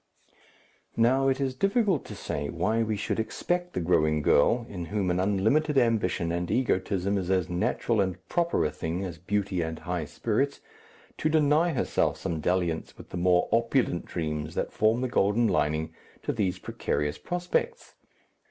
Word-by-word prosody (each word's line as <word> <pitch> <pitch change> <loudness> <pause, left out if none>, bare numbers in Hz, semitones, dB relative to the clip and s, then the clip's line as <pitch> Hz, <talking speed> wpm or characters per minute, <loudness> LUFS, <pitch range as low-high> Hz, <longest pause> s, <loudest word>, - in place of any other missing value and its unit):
Now, 130 +4 +3
it 135 0 +1
is 135 -2 0
difficult 195 - +1
to - - -8
say 70 0 -4
why 110 +8 0
we 110 -2 -1
should 105 - -2
expect 175 +10 -2
the - - -1
growing 75 -3 +2
girl, 115 +13 +3
in 90 -6 -6
whom 100 -1 -1
an 90 - 0
unlimited 110 +11 +2
ambition 105 -9 +2
and 85 0 -2
egotism 100 -5 0
is 90 -1 -4
as 95 -3 +1
natural 100 +5 +1
and 95 -1 -1
proper 170 - +1
a 75 - 0
thing 85 +4 -3
as 85 -4 -7
beauty 95 0 -1
and 80 -1 -3
high 90 -2 -3
spirits, 120 - -1 0.6
to 155 - +1
deny 155 +2 +3
herself 130 - 0
some 80 -2 -3
dalliance 85 0 -1
with - - -12
the - - -4
more 90 0 +3
opulent 115 -5 +1
dreams 75 -2 -3
that - - -2
form 110 +3 +2
the 130 - 0
golden 115 0 +2
lining 75 -4 0 0.3
to - - -1
these 95 -4 0
precarious 75 -4 -2
prospects? 180 - -2
100 Hz, 165 wpm, -27 LUFS, 85-130 Hz, 0.6 s, Now